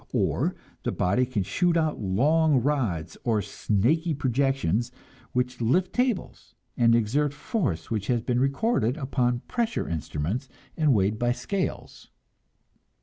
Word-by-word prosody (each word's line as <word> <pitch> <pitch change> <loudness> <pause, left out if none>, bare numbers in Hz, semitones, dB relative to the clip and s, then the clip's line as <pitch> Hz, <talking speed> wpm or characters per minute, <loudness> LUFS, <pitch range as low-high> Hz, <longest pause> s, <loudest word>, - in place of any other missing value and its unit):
Or - - +1 0.3
the - - -1
body 110 +8 +1
can 115 -6 -1
shoot 175 - +1
out 155 -5 0
long 145 +9 +3
rods 105 - -1
or 115 -3 +2
snaky 145 - 0
projections, 130 - 0 0.4
which 125 0 -1
lift 175 +11 +2
tables, 250 -6 -2 0.2
and 115 -1 +4
exert 140 +6 +1
force 145 - -2
which 105 -2 -2
has 120 -2 +1
been 125 0 0
recorded 135 - +1
upon 125 -4 0
pressure 235 -2 -2
instruments 85 - -3 0.3
and 150 -5 +3
weighed 105 +2 +1
by 120 0 +2
scales. 180 +11 -4
125 Hz, 130 wpm, -26 LUFS, 110-150 Hz, 0.4 s, and